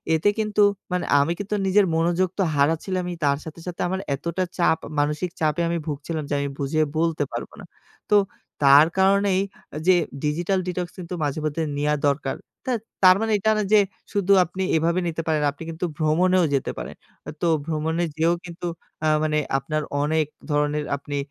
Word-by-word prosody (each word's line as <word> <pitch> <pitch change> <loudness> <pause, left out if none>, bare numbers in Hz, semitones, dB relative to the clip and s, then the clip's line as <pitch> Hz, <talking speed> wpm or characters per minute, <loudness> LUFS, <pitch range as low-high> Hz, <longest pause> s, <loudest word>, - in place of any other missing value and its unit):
এতে 160 +6 +3
কিন্তু 210 -1 +1 0.3
মানে 180 0 -1
আমি 145 +4 +2
কিন্তু 205 +1 -2
নিজের 195 +1 +4
মনোযোগ 175 +3 +2
তো - - +4
হারাচ্ছিলামই 175 +5 0
তার 140 -1 +3
সাথে, 160 +1 -9
সাথে 175 - -5
আমার 190 +1 -2 0.2
এতটা 170 +6 -2
চাপ 170 -2 +3
আ - - -10
মানসিক 150 +5 0
চাপে 155 +1 +1
আমি 170 - 0
ভুগছিলাম 150 +2 -3
যে - - -1
আমি 140 0 -2
বুঝিয়ে 145 +3 +1
বলতে 160 -2 +1
পারব - - -5
না। - - -10 0.4
তো 210 - +5 0.5
তার 140 +3 +8
কারণেই 195 0 +3 0.4
আ - - -3
যে 185 - +7 0.3
ডিজিটাল 175 +6 0
ডিটক্স 180 -1 -3
কিন্তু 180 0 -7
মাঝে 145 +1 -1
মধ্যে 155 +2 -1 0.2
নেয়া 150 +1 +1
দরকার। 140 -1 0 0.3
তা 260 - -1 0.3
তার 185 0 +9
মানে 225 0 0
এই - - -8 0.2
না 215 - +1
যে 215 - +8 0.3
শুধু 200 -2 +1
আপনি 185 +2 -4
এভাবে 170 +3 +2
নিতে 165 -1 -2
পারেন। 155 -2 +1
আপনি 145 +3 -10
কিন্তু 165 +2 -3
ভ্রমণেও 180 +4 +3
যেতে 135 - 0
পারেন। - - -6 0.3
আ - - -4
তো 175 - +2 0.2
ভ্রমণে 160 +1 -1
যেয়েও 165 +2 +2
কিন্তু 175 0 -6 0.3
অ্যা 155 - +2
মানে 155 -1 +1 0.2
আপনার 155 +3 -2 0.2
অনেক 155 +1 +1 0.3
ধরনের 150 0 +1
আপনি 145 +1 -5
165 Hz, 185 wpm, -23 LUFS, 150-185 Hz, 0.5 s, তার